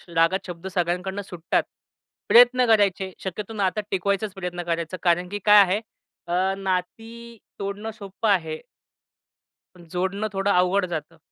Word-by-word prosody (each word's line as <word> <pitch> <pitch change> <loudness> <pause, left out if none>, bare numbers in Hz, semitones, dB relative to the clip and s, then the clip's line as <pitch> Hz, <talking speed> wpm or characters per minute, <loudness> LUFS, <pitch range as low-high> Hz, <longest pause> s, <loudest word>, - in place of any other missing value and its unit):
श - - -22
रागात 165 +4 +2
शब्द 175 0 -8
सगळ्यांकडनं 180 +3 -1
सुटतात. 175 -4 -1 0.7
प्रयत्न 245 +1 +6
करायचे, 200 -4 +2
शक्यतो 195 +3 -5
नातं 200 0 0
टिकवायचाच 200 +2 -1
प्रयत्न 180 -2 -5
करायचा, 170 +1 -3
कारण 175 0 +2
की 205 - -4
काय 210 0 +8
आहे 195 +2 +1 0.5
अ, 185 +2 +1
नाती 225 +5 -4 0.2
तोडणं 200 +2 -4
सोपं 200 +2 -4
आहे. 160 -5 +1 1.2
पण 175 -1 -15
जोडणं 190 +4 -1
थोडं 195 +1 +1
अवघड 180 +1 +3
जातं. 165 -1 -6
190 Hz, 140 wpm, -24 LUFS, 180-205 Hz, 1.2 s, काय